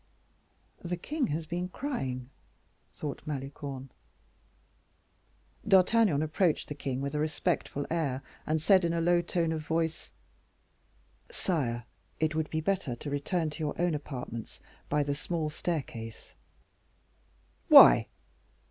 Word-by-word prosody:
"The 175 0 -2
king 285 - -1
has 160 0 -2
been 175 +3 -3
crying," 130 - -4 0.6
thought 145 -2 -5
Malicorne. 135 -2 -5 1.8
D'Artagnan 190 -4 +5
approached 155 +1 +1
the - - -3
king 135 -2 -3
with 140 +1 -3
a 150 - -1
respectful 155 -2 -1
air, 140 -6 -1 0.2
and 155 +1 +1
said 190 +4 +5
in 170 0 +1
a 170 - 0
low 175 +1 +3
tone 170 -1 0
of 160 -1 -2
voice: 160 0 -2 1.2
"Sire, 135 - -1 0.4
it 155 -1 +1
would 155 0 -1
be 160 - -1
better 180 -8 -1
to 145 +4 -7
return 155 +3 -1
to 150 - -9
your 155 -2 -3
own 175 -1 +2
apartments 125 -6 -6 0.3
by 150 0 +2
the 145 0 -1
small 155 +1 -2
staircase." 130 -9 -5 1.3
"Why?" - - +9
155 Hz, 125 wpm, -30 LUFS, 140-175 Hz, 1.8 s, Why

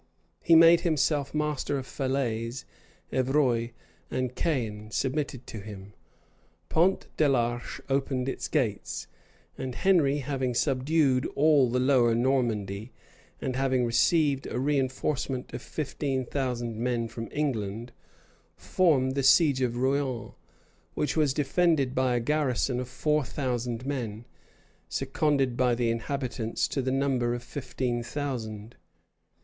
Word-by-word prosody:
He 165 - +5
made 165 +1 +8
himself 150 -4 +1
master 150 -2 -1
of 130 - -5
Falaise; 125 -3 -2 0.5
Evreux 130 -3 +2 0.4
and 130 -1 -2
Caen 110 -9 -2
submitted 130 +2 -2
to 110 - -7
him; 100 -1 -10 0.8
Pont 180 +4 +2
de 150 -2 +4
l'Arche 120 -2 -1
opened 135 -1 0
its 135 - -3
gates; - - -1 0.5
and 130 -2 -4
Henry, 160 -7 +3
having 135 -3 -2
subdued 135 0 +2
all 145 -4 +4
the 125 +2 0
lower 125 -3 +4
Normandy, 115 -4 0 0.5
and 130 -1 -3
having 130 -2 +1
received 135 +4 +2
a - - -5
reënforcement 130 0 -1
of - - -5
fifteen 135 -3 -3
thousand 120 -4 -3
men 120 0 -1
from 115 +1 -6
England,[] 115 -5 -2 0.7
formed 140 -8 +2
the 140 - 0
siege 135 0 +5
of 120 -2 0
Rouen, 130 -3 -1 0.6
which 150 - -1
was 150 -3 +3
defended 150 -1 +1
by 130 -2 +1
a - - +2
garrison 130 -1 0
of 125 -1 -5
four 150 +4 +1
thousand 125 -2 -3
men, 120 -5 -4 0.6
seconded 140 -5 0
by 125 -1 +2
the 120 -1 +1
inhabitants, 120 -1 -2
to 135 - -1
the 130 - -1
number 130 -3 +1
of 120 - -6
fifteen 125 -2 -3
thousand. 120 -5 -5
130 Hz, 125 wpm, -28 LUFS, 120-140 Hz, 0.8 s, made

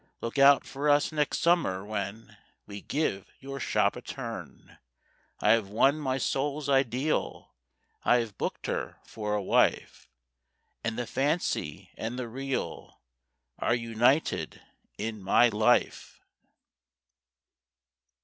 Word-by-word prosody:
Look 115 +4 -4
out 140 0 +7
for 140 +2 -2
us 145 +2 +3
next 150 -2 0
summer, 165 - +2
when 105 +1 -5 0.3
We 100 -1 -8
give 120 - -2
your 135 0 -7
shop - - +1
a - - -7
turn. - - -8 0.6
I 105 - +4
have 115 -3 +3
won 135 +8 +3
my 130 -3 -1
soul's 140 +2 -1
ideal, 135 +1 0 0.5
I - - +4
have 115 -4 -3
booked - - -4
her - - -3
for 105 -1 -3
a 105 - -1
wife; - - +1 0.7
And 110 -1 -2
the 120 - -2
Fancy 135 - -2
and 115 +3 -4
the 125 -2 -4
Real 135 +3 -5 0.6
Are 120 - +2
united 120 +5 +1 0.4
in 110 0 -4
my 110 +5 +4
life. 110 0 +1
120 Hz, 120 wpm, -28 LUFS, 110-140 Hz, 0.7 s, out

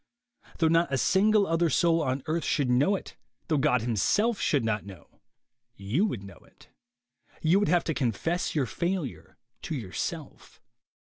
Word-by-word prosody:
Though 165 - +3
not 165 -2 +2
a 130 - +1
single 205 - +3
other 165 -1 +1
soul 165 0 +2
on 130 -2 -2
earth 160 +2 -1
should 140 -5 0
know 145 +11 +3
it, - - -8 0.3
though 155 -3 +2
God 135 -4 +2
himself 200 - +1
should 140 -6 +1
not 110 -2 -1
know, 100 -3 -14 0.5
you 115 - 0
would 110 - -5
know 95 -4 -12
it. - - -22 0.7
Y'ou 170 +5 +4
would 205 - +1
have 175 -1 +3
to 160 - -2
confess 145 - -1
your 145 -4 +1
failure 170 +1 -4 0.2
to 160 - -4
your 105 -9 -7
self. - - -6
155 Hz, 165 wpm, -27 LUFS, 125-175 Hz, 0.7 s, Y'ou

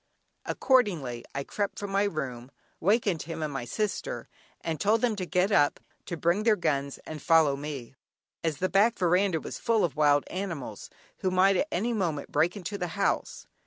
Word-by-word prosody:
Accordingly, 175 - +1
I 140 - -1
crept 205 +7 -3
from 205 -1 -5
my 200 +1 +2
room, 130 -9 -4 0.3
wakened 200 -2 +2
him 165 0 -5
and 150 -2 -3
my 135 -3 -3
sister, 215 - -3 0.3
and 160 -2 -3
told 220 +2 +3
them 235 -3 +2
to 185 -3 -4
get 180 +4 +2
up, 145 -7 +3 0.3
to 170 - -4
bring 170 +6 +2
their 220 -1 +4
guns, 140 -6 -1
and 155 -2 -7
follow 160 -3 +4
me, 140 -4 -6 0.5
as 160 -3 0
the 185 - +1
back 210 +5 +3
veranda 180 -1 +2
was - - -7
full 225 -4 +2
of 160 - -4
wild 145 -1 +4
animals, 185 -7 -5 0.3
who 190 - 0
might 185 +2 +4
at 290 - +1
any 230 +7 0
moment 170 -9 -2
break 165 +7 +2
into 200 +2 -5
the 180 - -1
house. 200 - -1
175 Hz, 185 wpm, -28 LUFS, 150-200 Hz, 0.5 s, their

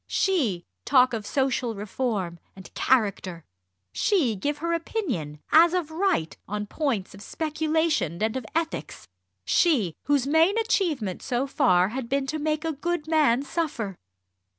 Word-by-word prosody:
she 245 - +1 0.2
talk 255 -2 +4
of 215 -3 -4
social 255 -4 0
reform 200 -4 -3 0.2
and 190 -1 -13
"character," 200 -9 0 0.5
she 310 - +2
give 285 +9 -2
her 335 +3 -1
opinion, 265 - -3
as 335 +2 +6
of 335 -4 -2
right, 320 - 0
on 210 +1 -3
points 235 -5 -2
of 200 - -12
speculation 310 - -1
and 220 +2 0
of 260 - -3
ethics, 330 0 -3 0.4
she, 245 - +3
whose 280 -2 +2
main 325 +8 +3
achievement 330 - 0
so 250 0 -1
far 195 -10 +3
had 240 +1 -5
been 275 0 0
to 310 +3 -3
make 310 +1 -1
a 325 - 0
good 315 +1 -3
man 295 -6 +3
suffer! 280 - -3
270 Hz, 145 wpm, -26 LUFS, 210-320 Hz, 0.5 s, as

